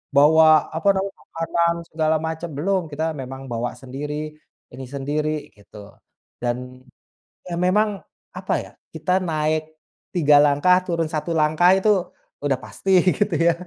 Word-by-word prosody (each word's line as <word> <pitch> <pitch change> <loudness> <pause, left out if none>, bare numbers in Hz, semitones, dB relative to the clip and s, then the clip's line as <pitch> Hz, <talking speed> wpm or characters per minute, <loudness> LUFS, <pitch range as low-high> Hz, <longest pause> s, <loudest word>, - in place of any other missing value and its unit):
bawa 155 +1 +6
apa, 165 +5 -2
namanya 195 0 -2 0.2
makanan 170 +1 0
segala 160 0 +1
macam, 160 +1 -5
belum, 185 +7 0
kita 155 +2 -2
memang 135 0 -7
bawa 120 0 -3
sendiri, 150 +3 -6 0.4
ini 130 - -8
sendiri 150 +2 -2
gitu. 100 0 -14 0.5
Dan, 125 +1 -4 0.7
ya, 170 - -4
memang 185 +5 +2 0.5
apa, - - -2
ya, - - -11 0.2
kita 185 +1 0
naik 155 -1 0 0.5
3 150 -4 +5
langkah, 145 +6 +4
turun 165 -3 -1
1 160 +1 -3
langkah 155 +3 +4
itu 195 +3 +1 0.6
udah 135 -3 +1
pasti 195 - -5 0.3
gitu, 205 -3 0
ya, 170 0 +4
155 Hz, 135 wpm, -22 LUFS, 140-170 Hz, 0.7 s, bawa